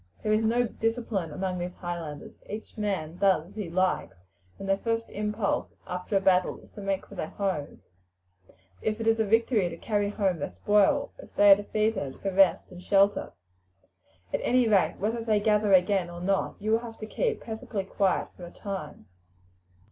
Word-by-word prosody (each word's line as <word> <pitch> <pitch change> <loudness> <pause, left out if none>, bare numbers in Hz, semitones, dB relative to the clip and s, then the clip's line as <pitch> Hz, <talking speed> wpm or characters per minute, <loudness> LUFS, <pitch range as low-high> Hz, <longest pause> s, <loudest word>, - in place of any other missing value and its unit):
There 215 - +2
is 215 - +3
no 235 +2 +3
discipline 225 -7 -2
among 185 +3 -3
these 175 +1 -4
Highlanders. 170 -4 -6 0.2
Each 215 +1 -7
man 190 -6 -2
does 185 -4 +2
as 200 - -18
he 210 -5 -4
likes, 180 - 0 0.4
and 195 - -7
their 195 0 +2
first 230 0 -2
impulse 210 0 -2
after 180 +3 -2
a - - +4
battle 185 -1 +2
is - - -19
to 205 - -10
make 195 -1 -2
for - - -14
their 180 -5 -4
homes 185 -8 -3 1.0
if 215 +1 -1
it 225 - -3
is 225 0 +3
a - - +4
victory, 220 -2 +2
to - - -8
carry 205 -2 0
home 195 -5 0
their 145 - -3
spoil; 200 - +2
if - - -12
they 205 0 +7
are - - +11
defeated, 205 -8 -1
for 195 - -2
rest 195 0 +4
and 180 0 -10
shelter. 200 +2 +2 1.0
At - - 0
any 250 -1 +3
rate, 200 -4 +3
whether 225 +3 -1
they 215 -2 +2
gather 210 -1 +2
again 185 -1 +4
or 175 0 -8
not, 195 +2 0
you 215 +1 -1
will 225 - +4
have 230 -1 -9
to 215 - -6
keep 455 - -1
perfectly 220 -2 -4
quiet 195 0 0
for 175 - -9
a - - -12
time. 190 - -7
200 Hz, 190 wpm, -28 LUFS, 180-215 Hz, 1.0 s, are